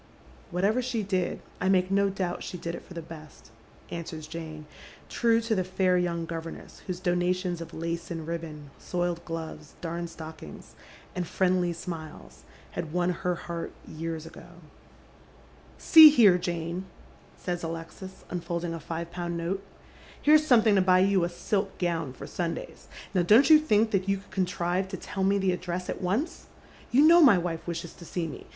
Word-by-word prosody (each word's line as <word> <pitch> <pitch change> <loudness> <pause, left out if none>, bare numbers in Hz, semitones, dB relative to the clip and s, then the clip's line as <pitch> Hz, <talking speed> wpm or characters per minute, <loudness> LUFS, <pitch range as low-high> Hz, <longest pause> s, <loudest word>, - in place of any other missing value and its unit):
" 65 0 -23
Whatever 200 +7 +1
she 240 -3 -2
did, 190 -2 -1 0.2
I 185 - +2
make 185 -1 +3
no 200 0 +3
doubt 185 -2 -3
she 180 - -6
did 170 0 -5
it - - -7
for 180 - -13
the 170 - -5
best," 155 -6 -12 0.4
answers 160 -2 -6
Jane, 155 -1 -7 0.4
true 230 -1 +3
to 230 0 -1
the 190 -3 +1
fair 185 0 +1
young 170 -2 0
governess 165 0 -7
whose 180 -2 -3
donations 180 -1 0
of 165 - -8
lace 170 +1 -4
and 165 -2 -5
ribbon, 155 -3 -6
soiled 175 -1 -2
gloves, 160 -2 -7
darned 170 0 -4
stockings, 160 -1 -10 0.4
and 180 -2 -2
friendly 180 -1 +1
Bmiles, 165 -2 -8 0.3
had 160 - -5
won 180 +1 +1
her 180 0 -1
heart 170 -1 -6
years 160 0 -5
ago. 165 - -12 0.7
" - - -26
3e« 320 -2 +10
here, 210 -11 +6
Jane," 175 0 -3 0.5
says 175 -1 -3
Alexis, 165 +3 -7
unfolding 170 -1 -3
a 165 - -5
five 165 +2 -5
pound 175 -1 -3
nota. 175 +4 -2 0.4
" - - -21
Here's 305 +1 +5
something 225 -5 +5
to 195 - +5
buy 185 0 +5
you 195 -1 +3
a 170 - 0
silk 195 +3 -2
gown 165 -6 -1
for - - -9
Sundays. 170 -2 -5 0.3
Now 185 - +3
don't 225 - +6
you 310 - +10
think 220 -7 +2
that 195 -1 0
you 195 - +2
could 200 +1 -16
conti 185 -2 -1
ive 180 +2 0
to 190 0 -6
tell 190 +2 -4
me 200 +1 +3
the 190 -1 +2
address 180 0 -3
at - - -6
once? 205 - -2 0.4
You 265 +5 +5
know 340 +2 +8
my 245 - +8
wife 170 -2 -3
wishes 170 0 -4
to - - -13
see 170 0 -3
me. 155 - -8
175 Hz, 185 wpm, -28 LUFS, 165-190 Hz, 0.7 s, 3e